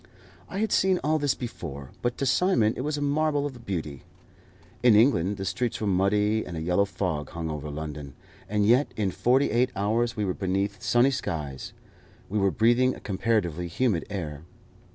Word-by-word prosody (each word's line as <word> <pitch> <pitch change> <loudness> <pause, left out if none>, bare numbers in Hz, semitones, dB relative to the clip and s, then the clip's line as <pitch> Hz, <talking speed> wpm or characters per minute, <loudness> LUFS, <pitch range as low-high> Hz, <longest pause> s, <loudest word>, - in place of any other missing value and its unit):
I 190 - -5
had 220 +2 0
seen 190 -1 +3
all 155 +1 +2
this 145 -2 +1
before, 70 - -7
but 120 0 -1
to 140 - -1
Simon 130 - +3
it - - -4
was 150 +2 -2
a 145 - -2
marvel 145 0 +1
of 125 -5 -7
beauty. 80 -8 -4 0.8
In 120 -3 +6
England 105 -5 +3
the 95 - -4
streets 120 +3 -2
were 110 - -2
muddy, 105 +3 +2
and 85 - -7
a - - -3
yellow 90 +4 +2
fog 90 -6 -3
hung 80 -1 -4
over 75 0 -5
London, 75 -2 -6 0.3
and 105 0 +1
yet 125 +7 +4
in 100 -3 0
forty 130 +8 +2
eight 125 +3 +2
hours 115 +4 0
we 105 - 0
were 95 - 0
beneath 95 +1 -2
sunny 120 +3 +3
skies, 75 - -4 0.6
we 105 +2 0
were 100 0 +3
breathing 120 +5 +3
a - - -11
comparatively 95 -5 -1
humid 95 0 0
air. 80 -8 -5
105 Hz, 185 wpm, -26 LUFS, 85-125 Hz, 0.8 s, In